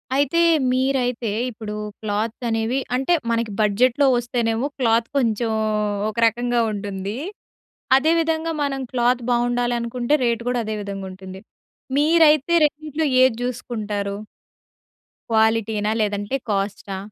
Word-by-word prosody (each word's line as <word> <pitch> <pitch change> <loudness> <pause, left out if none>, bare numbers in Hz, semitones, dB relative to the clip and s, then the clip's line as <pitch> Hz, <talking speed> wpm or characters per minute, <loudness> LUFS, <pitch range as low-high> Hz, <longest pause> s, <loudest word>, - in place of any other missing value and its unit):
అయితే 285 +5 +2 0.3
మీరైతే 255 -3 0 0.2
ఇప్పుడు 215 -2 -7 0.3
క్లాత్ 215 +1 -2
అనేవి 225 +3 0 0.2
అంటే 270 +7 +1 0.2
మనకి 230 -1 -1
బడ్జెట్‌లో 240 +7 +3
వస్తేనేమో 240 0 -1
క్లాత్ 230 -2 +2
కొంచెం 230 -3 0 0.6
ఒక 215 - -8
రకంగా 240 +1 0
ఉంటుంది. 200 0 -5 0.8
అదే 310 +4 +2
విధంగా 325 0 0
మనం 275 -1 -2
క్లాత్ 245 0 +1
బావుండాలనుకుంటే 240 +1 0
రేట్ 235 -1 0
కూడా 245 -1 0
అదే 215 0 -3
విధంగా 195 -1 -6
ఉంటుంది. 190 0 -10 0.6
మీరైతే 310 0 +4
రెండిట్లో 305 +1 -2 0.2
ఏది 260 -3 +3
జూసుకుంటారు? 215 -5 -3 1.2
క్వాలిటీనా 220 -1 +2
లేదంటే 205 +3 -1
కాస్టా? 200 0 -2
235 Hz, 110 wpm, -22 LUFS, 215-255 Hz, 1.2 s, మీరైతే